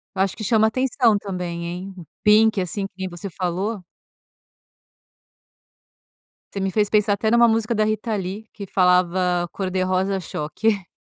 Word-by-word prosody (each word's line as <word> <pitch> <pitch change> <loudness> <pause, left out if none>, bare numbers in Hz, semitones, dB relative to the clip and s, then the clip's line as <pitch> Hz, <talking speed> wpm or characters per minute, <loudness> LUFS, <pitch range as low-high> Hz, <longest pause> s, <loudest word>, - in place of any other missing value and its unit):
Eu 190 - 0
acho 195 -1 0
que 215 - -7
chama 220 0 +3
atenção 245 -2 +2
também 180 -4 -5
hein? 180 +3 -6
O 175 - -10 0.2
pink, 210 -1 +5
assim, 195 +2 -3
que - - -40
nem 190 -1 -4
você 175 +3 -7
falou. 190 +4 -3 2.7
Você 200 - -3
me 195 0 -1
fez 210 +1 +1
pensar 210 -1 +3
até 205 +2 -2
em 230 - +3
uma 235 0 +6
música 225 0 +1
da 215 - +2
Rita 215 +1 -1
Lee 200 +3 -5
que 205 - -7
falava 180 -1 +2
cor 190 -2 -3
de 185 0 -1
rosa 185 +1 0
choque. 185 +4 -2
195 Hz, 170 wpm, -22 LUFS, 180-215 Hz, 2.7 s, uma